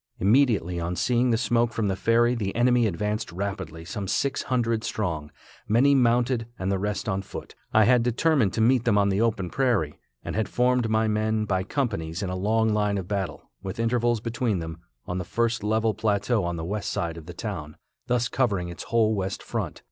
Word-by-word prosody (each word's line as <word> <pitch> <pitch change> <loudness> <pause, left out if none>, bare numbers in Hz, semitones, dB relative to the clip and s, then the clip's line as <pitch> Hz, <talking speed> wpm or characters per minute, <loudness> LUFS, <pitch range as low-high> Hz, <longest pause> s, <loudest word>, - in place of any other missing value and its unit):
Immediately 100 - +2
on 85 +1 -2
seeing 125 +5 +2
the 115 - +3
smoke 120 0 +1
from 110 -2 0
the 95 - 0
ferry 115 +4 +3
the 105 -5 -3
enemy 120 0 +3
advanced 105 +2 -2
rapidly, 95 -3 -5
some 100 +2 -5
six 140 +8 0
hundred 115 -3 0
strong, 80 -11 -3 0.4
many 125 +7 +4
mounted 120 -2 +2
and 95 +1 -2
the 95 - 0
rest 105 +2 -2
on 95 -2 0
foot. 95 - -9 0.2
I 110 - +5
had 125 +2 +5
determined 125 - +2
to 115 - 0
meet 120 +1 +4
them 115 -4 +3
on 100 0 +3
the 100 +2 +1
open 105 -6 0
prairie, 115 - 0 0.3
and - - -4
had 110 -1 0
formed 125 -1 +2
my 110 0 +2
men 110 0 0
by 95 -3 0
companies 100 - -2
in 95 - -2
a - - -2
long 110 +4 +1
line 105 -1 +1
of 95 -2 -4
battle, 100 -2 -4
with 95 +2 -6
intervals 120 -1 +1
between 115 -2 -1
them, 80 0 -6 0.3
on 90 +1 -3
the - - -2
first 115 +2 -1
level 110 +1 +1
plateau 105 0 0
on 85 0 -2
the 80 -1 -4
west 100 +3 -3
side 85 -1 -2
of 80 -1 -11
the 90 - -8
town, 85 -8 -5 0.3
thus 125 -1 +1
covering 100 -10 0
its 85 - -8
whole 110 -2 +2
west 95 -2 -3
front. - - -4
110 Hz, 205 wpm, -26 LUFS, 95-120 Hz, 0.4 s, I